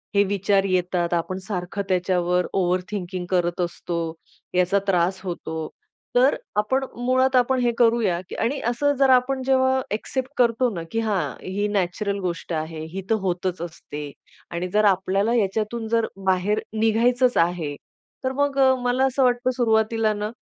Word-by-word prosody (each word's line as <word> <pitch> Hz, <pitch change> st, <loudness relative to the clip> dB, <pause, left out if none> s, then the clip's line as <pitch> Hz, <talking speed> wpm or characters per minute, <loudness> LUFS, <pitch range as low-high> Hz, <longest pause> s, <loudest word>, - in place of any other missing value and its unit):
हे 200 Hz, -, +6 dB
विचार 200 Hz, 0 st, +2 dB
येतात. 180 Hz, -1 st, 0 dB
आपण 175 Hz, +2 st, -1 dB
सारखं 185 Hz, 0 st, -4 dB
त्याच्यावर 180 Hz, -1 st, +1 dB
ओव्हर 180 Hz, 0 st, +2 dB
थिंकिंग 180 Hz, -3 st, -4 dB
करत 175 Hz, -1 st, 0 dB
असतो, 175 Hz, 0 st, -3 dB, 0.6 s
याचा 180 Hz, +2 st, +3 dB
त्रास 185 Hz, 0 st, +2 dB
होतो. 170 Hz, -3 st, -5 dB, 0.6 s
तर 255 Hz, +3 st, +5 dB, 0.3 s
आपण 265 Hz, +5 st, 0 dB, 0.2 s
मुळात 260 Hz, +1 st, +3 dB
आपण 255 Hz, +1 st, +3 dB
हे 240 Hz, -1 st, +2 dB
करूया 225 Hz, -7 st, +3 dB
की -, -, -6 dB
आणि 270 Hz, +4 st, 0 dB
असं 285 Hz, +4 st, +1 dB
जर 270 Hz, -1 st, +5 dB
आपण 260 Hz, +1 st, +3 dB
जेव्हा 260 Hz, 0 st, +3 dB
ॲक्सेप्ट 255 Hz, +5 st, -3 dB
करतो 245 Hz, 0 st, +3 dB
ना 170 Hz, -, -3 dB
की 225 Hz, -, 0 dB
हां, 195 Hz, -, -1 dB
ही 200 Hz, +3 st, -1 dB
नॅचरल 200 Hz, +1 st, -1 dB
गोष्ट 175 Hz, -2 st, -4 dB
आहे, 155 Hz, 0 st, -4 dB
ही 195 Hz, -, -3 dB
तर 225 Hz, -, +4 dB
होतच 180 Hz, -1 st, -2 dB
असते 150 Hz, -4 st, -7 dB, 0.4 s
आणि 175 Hz, +2 st, -2 dB
जर 210 Hz, 0 st, +4 dB
आपल्याला 195 Hz, +3 st, +2 dB
याच्यातून 220 Hz, +2 st, -1 dB
जर 230 Hz, 0 st, +1 dB, 0.2 s
बाहेर 190 Hz, +3 st, +2 dB, 0.2 s
निघायचंच 240 Hz, +3 st, +3 dB
आहे, 165 Hz, -4 st, +1 dB, 0.5 s
तर 260 Hz, -, 0 dB
मग 285 Hz, -1 st, +1 dB
अ, 265 Hz, -1 st, +6 dB
मला 250 Hz, +2 st, +2 dB
असं 265 Hz, +1 st, +1 dB
वाटतं 250 Hz, 0 st, +2 dB
सुरुवातीला 220 Hz, -2 st, +2 dB
ना 210 Hz, 0 st, -3 dB
205 Hz, 160 wpm, -23 LUFS, 180-245 Hz, 0.6 s, हे